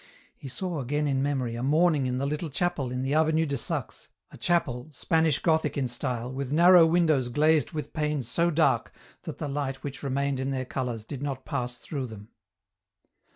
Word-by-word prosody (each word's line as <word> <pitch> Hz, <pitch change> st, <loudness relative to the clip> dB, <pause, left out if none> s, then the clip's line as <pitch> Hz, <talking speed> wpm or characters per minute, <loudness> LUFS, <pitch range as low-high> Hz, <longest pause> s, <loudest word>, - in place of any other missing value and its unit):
He -, -, -10 dB
saw 170 Hz, +5 st, -3 dB
again 145 Hz, +3 st, -1 dB
in 135 Hz, -2 st, +1 dB
memory 135 Hz, -4 st, -1 dB
a 120 Hz, -, -4 dB
morning 150 Hz, 0 st, +3 dB
in 125 Hz, 0 st, -1 dB
the 135 Hz, -, -1 dB
little 150 Hz, +3 st, -2 dB
chapel 150 Hz, -3 st, -1 dB
in 125 Hz, +1 st, -2 dB
the 135 Hz, +2 st, -1 dB
Avenue 160 Hz, +1 st, +3 dB
de 140 Hz, -2 st, -2 dB
Saxe, 120 Hz, -, -4 dB, 0.2 s
a -, -, -12 dB
chapel, 135 Hz, -6 st, 0 dB
Spanish 160 Hz, +2 st, +1 dB
Gothic 160 Hz, -4 st, +1 dB
in 135 Hz, -2 st, 0 dB
style, 125 Hz, 0 st, -3 dB
with 135 Hz, 0 st, -4 dB
narrow 170 Hz, +2 st, +7 dB
windows 160 Hz, -7 st, +2 dB
glazed 155 Hz, +4 st, +3 dB
with 150 Hz, -3 st, -5 dB
panes 150 Hz, -5 st, -1 dB
so 170 Hz, +8 st, +2 dB
dark 160 Hz, -1 st, +2 dB, 0.3 s
that -, -, -6 dB
the 150 Hz, -, -4 dB
light 140 Hz, -1 st, -3 dB
which 140 Hz, -1 st, -6 dB
remained 140 Hz, 0 st, -1 dB
in 130 Hz, +1 st, -2 dB
their 130 Hz, -1 st, -2 dB
colours 125 Hz, -4 st, -4 dB
did 135 Hz, +2 st, -7 dB
not 135 Hz, -2 st, -4 dB
pass 125 Hz, -4 st, -3 dB
through 135 Hz, -4 st, -5 dB
them. 110 Hz, -1 st, -11 dB
140 Hz, 195 wpm, -27 LUFS, 130-155 Hz, 0.3 s, narrow